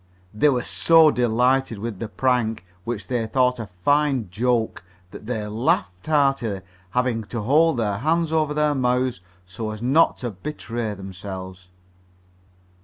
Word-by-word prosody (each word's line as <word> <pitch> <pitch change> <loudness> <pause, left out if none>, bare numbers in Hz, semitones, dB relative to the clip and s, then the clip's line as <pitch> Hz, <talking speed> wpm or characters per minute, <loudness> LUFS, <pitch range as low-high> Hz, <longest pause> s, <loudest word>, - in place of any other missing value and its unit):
They 105 +8 +3
were 125 -3 0
so 165 -2 +5
delighted 125 0 +1
with 105 -1 -5
their 115 - -4
prank, 110 -1 0 0.2
which 115 -3 -4
they 120 -3 -2
thought 125 +1 +2
a 110 - -5
fine 135 +5 +1
"joke," 115 0 0 0.3
that 105 - -11
they 110 -4 -2
laughed 105 -3 -1
heartily, 135 -9 +1 0.3
having 120 +1 0
to 115 +2 -4
hold 150 +6 +3
their 105 -4 -1
hands 160 +4 +1
over 155 -2 +1
their 150 0 +2
mouths 125 -4 0 0.2
so 110 +4 -5
as 110 0 -6
not 135 +8 +3
to 120 -2 -4
betray 115 -1 -5
themselves. 95 -1 -8
120 Hz, 145 wpm, -23 LUFS, 105-135 Hz, 0.3 s, so